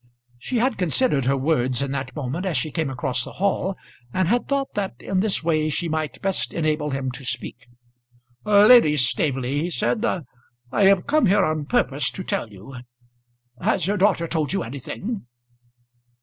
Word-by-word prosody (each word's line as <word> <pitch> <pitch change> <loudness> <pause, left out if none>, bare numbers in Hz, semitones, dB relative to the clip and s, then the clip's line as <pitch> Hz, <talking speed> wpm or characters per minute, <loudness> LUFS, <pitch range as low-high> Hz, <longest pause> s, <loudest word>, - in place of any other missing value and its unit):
She 245 - -3
had 240 0 +1
considered 175 - +1
her 135 +1 +2
words 130 -3 +1
in 140 -1 -2
that 130 -2 -4
moment 150 +5 -3
as 185 -7 0
she 150 +5 -1
came 160 -3 -1
across 130 -1 -2
the - - -9
hall, 195 0 -1 0.3
and 185 +3 +1
had 240 +5 +1
thought 275 -1 -1
that 195 - -3
in 190 - -1
this 200 -4 +1
way 155 -2 +1
she 170 +3 -1
might 155 -2 -3
best 195 -1 -1
enable 155 -2 0
him 135 -2 -2
to 125 +2 -9
speak. 120 0 -5 0.8
"Lady 210 -6 +6
Staveley," 135 0 0
he 170 - -2
said, 220 +5 0
"I 125 - -3
have 195 -2 +4
come 300 -5 +3
here 200 +1 +4
on 155 -1 -1
purpose 145 - +1
to 190 - -5
tell 115 - -2
you. 105 +6 -11 0.8
Has 180 - +1
your 205 +3 0
daughter 190 -3 +2
told 155 -4 -1
you 195 - 0
anything?" 140 - -6
155 Hz, 175 wpm, -23 LUFS, 135-195 Hz, 0.8 s, Lady